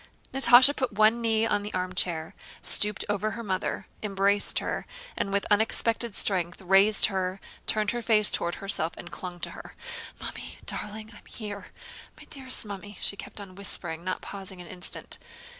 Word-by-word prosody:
Natásha 265 +1 +8
put 260 -6 -1
one 215 +3 +4
knee 225 -1 +2
on 205 -2 +1
the 205 +1 -6
armchair, 180 -3 -1 0.3
stooped 210 -1 +3
over 205 +1 0
her 235 - -5
mother, 190 -2 -2 0.2
embraced 200 0 +1
her, - - -2 0.3
and 195 - -2
with 200 0 +1
unexpected 225 +1 +3
strength 180 -3 0
raised 195 +3 +5
her, 190 -1 -1 0.3
turned 215 -1 +2
her 240 - -3
face 215 -3 +3
toward 170 - -1
herself, 195 -4 -2
and 175 - -9
clung 180 -1 -7
to - - -2
her. - - -11 0.4
"Mummy!... - - -7
darling!... 215 +1 -5
I - - -13
am - - -24
here, 205 -3 -7 0.5
my - - -12
dearest 260 -5 -2
Mummy," 205 -1 -8
she - - 0
kept 200 - -9
on 195 -2 -9
whispering, 175 -4 -4
not 185 0 -3
pausing 190 -2 -8
an 175 - -9
instant. 180 +1 -3
205 Hz, 170 wpm, -28 LUFS, 185-215 Hz, 0.5 s, Natásha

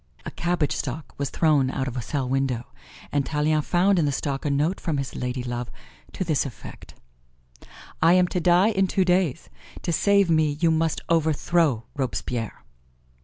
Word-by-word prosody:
A - - -5
cabbage 175 -4 -1
stalk 140 +3 -5
was 140 - -1
thrown 150 -5 +2
out 130 0 -2
of 125 - -5
a 125 - -2
cell 135 +2 -3
window, 130 -2 -1 0.5
and 145 -1 +1
Tallien 150 +1 +1
found 180 +4 +2
in 160 - +2
the 145 - +1
stalk 140 0 -3
a - - +1
note 150 +6 0
from 160 -5 -2
his 135 -1 -4
ladylove 125 -1 -3 0.5
to - - -2
this 155 -5 +1
effect: 135 -5 -10 1.1
"I 165 +2 +6
am 180 -1 +4
to 180 - -1
die 180 +4 +4
in 195 -3 +1
two 190 0 +1
days; 180 -4 +1 0.4
to 170 - -1
save 200 +3 +3
me 155 -2 +2
you 165 -1 +3
must 160 0 0
overthrow 160 -4 +1
Robespierre." 125 - -3
150 Hz, 170 wpm, -24 LUFS, 135-175 Hz, 1.1 s, I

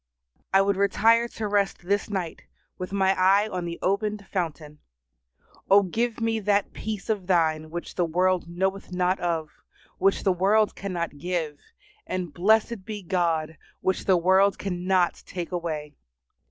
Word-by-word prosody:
I 195 0 +5
would 200 -1 +1
retire 225 +4 +3
to 220 -2 -5
rest 200 -3 0
this 200 +3 0
night 185 -5 -4 0.3
with 185 0 -5
my 195 -1 +3
eye 195 +3 +4
on 180 -4 -4
the 170 0 -5
opened 200 +1 -1
fountain. 155 -5 -4 0.9
O 200 +1 +7
give 230 +5 -1
me 225 -1 0
that 205 -1 +1
peace 215 -2 -5
of 205 -5 -2
Thine 160 -4 +1
which 175 +2 -6
the 175 - +1
world 180 +1 +1
knoweth 190 +2 -2
not 180 +1 +1
of, 165 -3 -2 0.5
which 195 +1 +2
the 190 - +3
world 205 +4 +3
cannot 170 -6 -4
give, 160 -3 -3 0.5
and, 180 -4 -3
blessed 215 +4 +2
be 210 -1 -6
God, 165 -3 0 0.2
which 190 - -1
the 190 -2 +4
world 190 +3 +4
cannot 180 -1 0
take 175 -2 -5
away! 155 -4 -4
185 Hz, 155 wpm, -26 LUFS, 175-200 Hz, 0.9 s, O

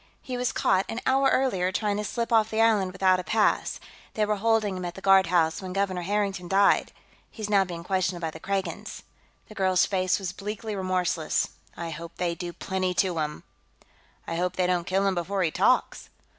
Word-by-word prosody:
He 255 - -6
was 245 0 0
caught, 190 0 +1
an 225 - -3
hour 270 +1 +3
earlier, 190 -9 +1
trying 205 +1 -1
to 210 - -2
slip 235 +2 -2
off 220 -1 +4
the 220 - -2
island 215 -5 +3
without 185 -1 +3
a - - -4
pass; 215 +2 +1 0.4
they 215 - +2
were 210 0 0
holding 215 -2 +1
him 185 - -5
at 175 0 -5
the - - -8
guardhouse 180 -4 +3
when 185 -1 -6
Governor 195 -2 -1
Harrington 195 -1 -1
died. 195 +2 +3 0.4
He's 215 -2 -6
now 195 -2 +4
being 170 -2 -7
questioned 185 -1 -1
by 165 -2 -3
the 160 - -10
Kragans." 195 +2 -4 0.4
The - - -12
girl's 185 -3 +2
face 185 -2 +1
was 185 -3 -4
bleakly 210 +2 -5
remorseless. 185 -4 0 0.3
"I 170 -1 -4
hope 165 +2 -8
they 175 -1 0
do 175 +1 -6
plenty 185 +1 -2
to 185 -2 +1
him!" 150 -1 -3 0.8
"I 165 - -3
hope 180 +1 -1
they 185 - +1
don't 180 -1 0
kill 195 +1 +1
him 195 - +2
before 185 +2 -1
he 160 - +1
talks." - - +1
190 Hz, 200 wpm, -26 LUFS, 180-205 Hz, 0.8 s, off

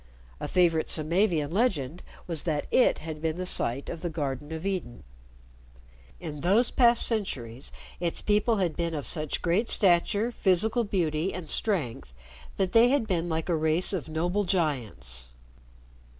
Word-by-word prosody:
A - - -4
favorite 170 -3 +2
Samavian 160 -1 +2
legend 175 - 0 0.2
was 165 -3 -2
that 155 -4 -1
it 255 - +4
had 155 -2 -6
been 160 0 -1
the 185 - -3
site 135 -6 -1
of 165 - -6
the 175 - -2
Garden 145 -2 -4
of 160 +3 -5
Eden. 180 -12 -3 1.2
In 150 -4 -7
those 205 +8 +3
past 235 -2 +4
centuries, 135 - -2 0.3
its 170 -1 -1
people 210 +2 +2
had 180 -6 0
been 170 0 -2
of 145 - -4
such 155 -3 -2
great 185 +7 +1
stature, 200 +5 +3
physical 215 +3 +2
beauty, 175 -4 -1
and 180 -3 -6
strength, 135 - -2 0.4
that 190 -2 0
they 230 +2 +6
had 275 -3 +2
been 175 -4 -1
like 160 0 -2
a 175 - +1
race 160 +4 +1
of 170 -4 -3
noble 175 +6 0
giants. 115 - -2
170 Hz, 155 wpm, -27 LUFS, 155-195 Hz, 1.2 s, they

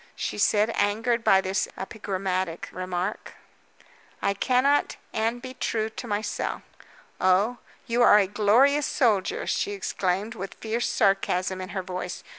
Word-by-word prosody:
she - - -4
said, 210 +2 +3
angered 230 +3 +1
by 195 - +5
this 190 0 -1
epigrammatic 190 -4 -3
remark. 185 +2 -4 0.9
"I 200 - +1
cannot 260 +7 +2 0.2
and 230 +3 -1
be 255 0 -7
true 220 -3 -2
to 240 - -7
myself." 205 0 -3 0.6
"Oh? 200 +6 +2 0.3
you 235 +1 0
are 210 - +7
a 205 - +4
glorious 230 +9 +3
soldier," 245 - +1
she 410 - -1
exclaimed, 200 - -2
with 195 -3 -7
fierce 225 +2 -2
sarcasm 185 -1 +1
in 185 - -6
her 190 -2 -4
voice. 180 -1 -5
205 Hz, 135 wpm, -26 LUFS, 190-235 Hz, 0.9 s, are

